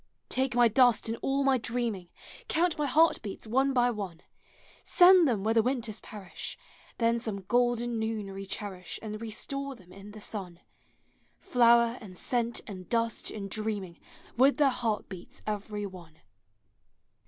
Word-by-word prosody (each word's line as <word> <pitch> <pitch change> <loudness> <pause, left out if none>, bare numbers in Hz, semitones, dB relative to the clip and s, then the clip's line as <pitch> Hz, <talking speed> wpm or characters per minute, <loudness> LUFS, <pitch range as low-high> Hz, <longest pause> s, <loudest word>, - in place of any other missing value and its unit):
Take 260 -1 -1
my 240 -1 +6
dust 240 0 +4
and 225 - -2
all 275 +1 +1
my 270 -2 +3
dreaming, 230 -6 -2 0.4
• - - -43
Count 340 0 +1
my 300 -1 -1
heart 320 +5 +4
beats 200 +1 -7
one 265 +5 +2
by 245 -2 +3
one, 195 -7 -6 0.6
Send 360 -2 +7
them 220 -7 0
where 220 +1 +2
the 225 - +5
winters 230 -3 -2
perish; 200 -4 -8 0.4
Then 230 0 +2
some 215 -4 -4
golden 240 +2 +1
noon 220 -3 -3
recherish 195 -1 -6
And 215 0 -6
restore 275 +5 -3
them 185 -6 -18
in 200 +1 -11
the 215 +1 -11
sun. 190 -5 -6 0.8
Flower 235 0 +4
and 185 -4 -11
scent 235 +1 0
and 185 -4 -9
dust 230 -1 0
and 200 -2 -6
dreaming, 205 -4 -3 0.4
With 265 +4 +4
their 290 -2 +5
heart 235 -5 -2
beats 185 -3 -11
every 210 0 -3
one! 175 -5 -11
225 Hz, 155 wpm, -29 LUFS, 205-245 Hz, 0.8 s, Send